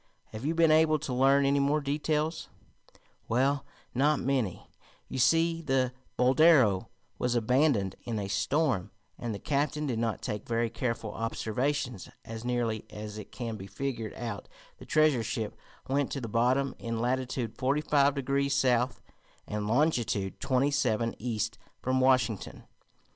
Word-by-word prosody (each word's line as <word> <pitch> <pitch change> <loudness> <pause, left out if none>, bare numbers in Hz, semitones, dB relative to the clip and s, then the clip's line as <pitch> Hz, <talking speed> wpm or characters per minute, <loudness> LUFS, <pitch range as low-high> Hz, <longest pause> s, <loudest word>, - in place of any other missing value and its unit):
Have 110 +2 -7
you 160 +2 0
been 165 -1 +5
able 155 0 +5
to 140 -3 -4
learn 135 +2 +4
any 140 +1 +3
more 140 +2 +2
details?" 150 +2 -1 0.8
"Well, 135 +4 +1 0.3
not 145 +3 +3
many. 125 -8 -1 0.4
You - - -4
see, 165 +5 +3
the 130 -4 +1 0.2
Boldero 130 - +5 0.3
was 125 -1 0
abandoned 120 -4 +2
in 115 -2 -3
a 100 -2 -3
storm, 105 - 0 0.3
and 120 - -3
the 105 - -3
captain 150 +4 -1
did 120 -5 -1
not 115 -2 -2
take 105 -1 -4
very 115 -1 0
careful 115 -3 -3
observations. 125 +1 -2 0.2
As 115 0 -7
nearly 120 -3 -1
as 105 0 -7
it 105 0 -10
can 115 -3 -5
be 95 -1 -8
figured 120 -3 -4
out 115 -4 -5 0.3
the - - -12
treasure 155 -5 +3
ship 110 0 -3 0.3
went 140 0 0
to 140 - -2
the 115 - -4
bottom 125 +5 +1
in 115 -1 -3
latitude 125 -1 -1
forty 140 +3 +1
five 145 -2 +3
degrees 140 +1 0
south, 125 -2 +1 0.4
and 105 0 -3
longitude 120 -6 +1
twenty 135 +1 +1
seven 115 -5 +1
east 115 -1 -2 0.2
from 130 +1 0
Washington. 130 -5 +1
125 Hz, 150 wpm, -29 LUFS, 115-140 Hz, 0.8 s, been